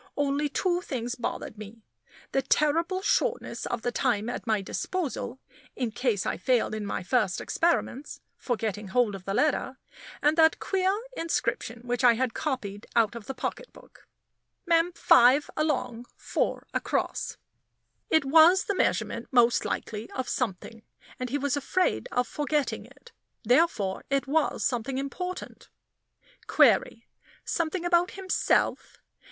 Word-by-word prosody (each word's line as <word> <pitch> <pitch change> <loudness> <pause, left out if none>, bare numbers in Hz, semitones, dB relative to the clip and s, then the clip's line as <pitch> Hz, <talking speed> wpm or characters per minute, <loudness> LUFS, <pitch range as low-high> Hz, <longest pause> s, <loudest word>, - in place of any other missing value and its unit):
Only 290 +1 0
two 355 +4 0
things 245 -7 -4
bothered 230 -3 -5
me; 215 +1 -11 0.5
the 270 - +1
terrible 330 +7 +1
shortness - - 0
of 240 -2 -3
the 245 - 0
time 235 -4 0
at 245 - -5
my 215 -2 +2
disposal, 265 - -3 0.4
in 245 -4 -2
case 225 -4 0
I - - -1
failed 240 +4 +1
in 215 -1 -4
my 195 - -3
first 190 -2 +1
experiments, 330 -4 -1 0.2
for 245 - -2
getting 210 -2 -4
hold 230 +1 +2
of 190 -1 -8
the 195 - -2
letter, 275 -3 +1 0.4
and 300 +1 +3
that 320 0 +5
queer 380 -1 +1 0.2
inscription 240 - -2
which 245 +1 -2
I 245 -1 +7
had 245 0 -1
copied 225 -9 -4
out 230 -2 +3
of 235 -3 -9
the 270 - -5
pocketbook: - - -7 0.6
"MEM. 335 0 +3
5 270 -3 +5
ALONG. 250 -6 -1
4 - - -2
ACROSS." - - -2 0.7
It 315 -3 +3
was 325 +7 +6
the 405 - -1
measurement 375 - 0
most 240 -2 +4
likely 215 +1 -4
of 260 - -3
something, 225 -1 -3 0.4
and 255 0 -3
he 280 - 0
was 285 -1 0
afraid 365 - 0
of 250 - 0
forgetting 295 -1 -2
it; - - -18 0.3
therefore 235 - +2
it 275 0 +1
was 300 +3 0
something 255 +1 -1
important. 360 +7 -6 0.8
Query - - +3 0.4
something 335 +1 -2
about 350 0 +3
himself? 380 -1 0
265 Hz, 140 wpm, -27 LUFS, 230-320 Hz, 0.8 s, I